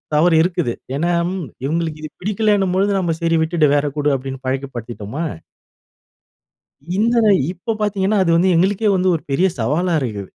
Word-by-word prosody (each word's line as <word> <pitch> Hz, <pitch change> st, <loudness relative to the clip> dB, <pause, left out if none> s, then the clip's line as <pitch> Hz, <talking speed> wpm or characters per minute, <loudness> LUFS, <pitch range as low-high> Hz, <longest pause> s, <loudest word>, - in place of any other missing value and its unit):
தவறு 165 Hz, +2 st, +4 dB
இருக்குது. 175 Hz, -8 st, -1 dB, 0.2 s
ஏன்னா 170 Hz, +5 st, 0 dB, 0.2 s
ம், 185 Hz, -3 st, -4 dB, 0.2 s
இவுங்களுக்கு 160 Hz, +1 st, -2 dB
இது 155 Hz, -, -6 dB
பிடிக்கலேணும்பொழுது 200 Hz, -1 st, +1 dB
நம்ம, 175 Hz, -3 st, 0 dB
"சரி, 165 Hz, 0 st, +2 dB
விட்டுடு 160 Hz, -1 st, +2 dB
வேற 145 Hz, 0 st, +1 dB
குடு" 145 Hz, 0 st, +1 dB
அப்பிடின்னு 135 Hz, 0 st, -6 dB
பழக்கிப்படுத்திட்டோமா, 130 Hz, -1 st, -4 dB, 1.7 s
இந்தத, 230 Hz, +1 st, +3 dB, 0.2 s
இப்ப 190 Hz, +5 st, -4 dB
பார்த்தீங்கன்னா, 205 Hz, 0 st, +1 dB
அது 170 Hz, -, +1 dB
வந்து 185 Hz, +2 st, +3 dB
எங்களுக்கே 200 Hz, +4 st, +2 dB
வந்து 185 Hz, 0 st, +2 dB
ஒரு 160 Hz, -, -4 dB
பெரிய 175 Hz, +8 st, +3 dB
சவாலா 155 Hz, +10 st, 0 dB
இருக்கு. 105 Hz, -6 st, -4 dB
170 Hz, 145 wpm, -19 LUFS, 145-190 Hz, 1.7 s, தவறு